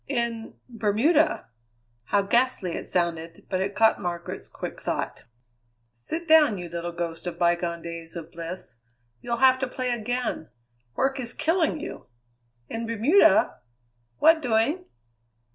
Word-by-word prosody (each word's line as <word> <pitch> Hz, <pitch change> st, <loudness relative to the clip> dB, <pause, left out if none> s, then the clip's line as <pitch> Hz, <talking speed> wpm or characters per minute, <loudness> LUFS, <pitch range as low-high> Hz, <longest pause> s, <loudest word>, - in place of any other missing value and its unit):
"In 235 Hz, -4 st, -2 dB
Bermuda." 245 Hz, +8 st, +2 dB, 0.6 s
How 200 Hz, +7 st, +2 dB
ghastly 235 Hz, -3 st, +1 dB
it -, -, -4 dB
sounded, 170 Hz, -2 st, -2 dB
but 185 Hz, -1 st, 0 dB
it 200 Hz, +1 st, -2 dB
caught 225 Hz, -2 st, +4 dB
Margaret's 175 Hz, -2 st, -5 dB
quick -, -, -7 dB
thought. -, -, -3 dB, 0.7 s
"Sit 320 Hz, -, -5 dB
down, 305 Hz, -9 st, +6 dB
you 175 Hz, -1 st, -6 dB
little 170 Hz, +1 st, -4 dB
ghost 170 Hz, 0 st, -5 dB
of 175 Hz, -, -4 dB
bygone 170 Hz, -1 st, 0 dB
days 170 Hz, 0 st, -7 dB
of 170 Hz, -1 st, -7 dB
bliss. 170 Hz, -6 st, -7 dB, 0.4 s
You'll 235 Hz, 0 st, -2 dB
have 260 Hz, +1 st, +5 dB
to 265 Hz, -, -1 dB
play 255 Hz, 0 st, -2 dB
again. 240 Hz, -6 st, -2 dB, 0.5 s
Work 270 Hz, 0 st, 0 dB
is 245 Hz, -2 st, -2 dB
killing 325 Hz, -1 st, +1 dB
you. 335 Hz, -, -8 dB, 0.6 s
In 230 Hz, 0 st, -4 dB
Bermuda? 230 Hz, -, +4 dB, 0.6 s
What 320 Hz, 0 st, +5 dB
doing?" 255 Hz, +9 st, +1 dB
220 Hz, 135 wpm, -26 LUFS, 175-260 Hz, 0.7 s, down